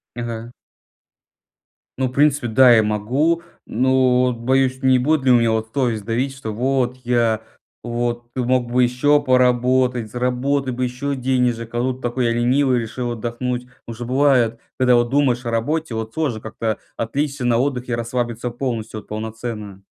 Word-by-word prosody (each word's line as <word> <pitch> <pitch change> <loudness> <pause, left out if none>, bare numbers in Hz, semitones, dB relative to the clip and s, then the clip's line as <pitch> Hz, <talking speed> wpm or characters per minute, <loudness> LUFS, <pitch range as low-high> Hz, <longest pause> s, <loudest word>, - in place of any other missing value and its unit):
Ага. 120 -1 -5 1.4
Ну, 130 0 0
в 125 - -7
принципе, 140 -1 +2
да, 125 +2 +6
я 110 - +4
могу, 125 +11 0 0.2
но 125 +1 +2
вот 125 -2 -1
боюсь, 130 +2 +1
не 130 -1 +4
будет 150 +1 +1
ли 130 - +5
у 120 - +7
меня 115 -1 +2
вот 110 0 -1
совесть 120 -7 -1
давить, 130 +4 -1
что 110 -6 -6
вот, 125 +2 0
я 120 -3 +1 0.4
вот, 120 0 -3
ты 130 - -2
мог 125 -1 0
бы 125 +1 +3
еще 145 +4 +3
поработать, 125 -2 +2
заработать 125 +2 -1
бы 125 - -2
еще 125 +3 -2
денежек, 125 -3 0
а 120 - -1
тут 130 +1 -2
такой 120 +1 -1
я 115 - +2
ленивый 125 +2 +2
решил 120 +1 -4
отдохнуть. 120 +2 -3 0.2
Уже 115 +1 -6
бывает, 125 -3 +2 0.2
когда 125 -1 +4
вот 120 0 +2
думаешь 130 -3 +1
о 115 - -2
работе, 130 +4 -1
вот 110 0 -4
сложно 145 -9 -1
как-то 110 -1 -3 0.2
отвлечься 140 +3 -2
на 120 -1 +3
отдыхе, 125 -2 -1
расслабиться 120 0 -3
полностью, 115 -3 -4
вот - - -16
полноценно. 110 -2 -6
125 Hz, 165 wpm, -20 LUFS, 115-130 Hz, 1.4 s, у